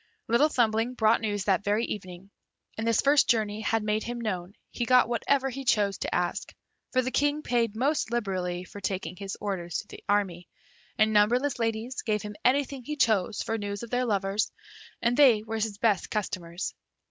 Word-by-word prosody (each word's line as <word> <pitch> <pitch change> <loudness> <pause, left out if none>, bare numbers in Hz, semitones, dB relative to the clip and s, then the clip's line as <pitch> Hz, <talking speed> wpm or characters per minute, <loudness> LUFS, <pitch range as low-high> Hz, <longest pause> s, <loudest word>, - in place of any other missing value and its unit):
Little 240 +7 +4
Thumbling 230 -2 +1
brought 220 0 +3
news 205 -3 -1
that 195 0 +1
very 210 +3 +1
evening, 185 -1 -7 0.4
and 220 +1 -3
this 230 -1 +3
first 285 +1 +4
journey 215 -2 +1
having 225 0 0
made 215 0 +1
him 240 +1 -4
known, 190 -4 -4 0.2
he 240 - -3
got 250 0 +5
whatever 265 +3 +1
he 270 +2 -6
chose 205 -6 +2
to - - -2
ask; 175 0 -2 0.4
for 255 0 +2
the 255 - -2
King 290 +2 +1
paid 230 -3 0
most 270 +1 +1
liberally 185 -6 -2
for 200 +2 -11
taking 190 -1 -3
his 195 +1 -6
orders 180 -5 -3
to 205 - -6
the - - -11
army, 185 -4 0 0.5
and 215 0 +3
numberless 245 +6 +3
ladies 225 +2 -2
gave 215 -2 -1
him 210 0 -7
anything 270 0 +1
he 300 +5 -4
chose 220 -6 +1
for 225 0 -2
news 205 +1 -4
of 235 - -8
their 250 0 +1
lovers, 200 -1 0 0.5
and 235 +1 +3
they 245 -7 +6
were 220 0 -5
his 215 -2 -2
best 210 -4 +1
customers. 180 -4 -3
220 Hz, 190 wpm, -28 LUFS, 200-240 Hz, 0.5 s, they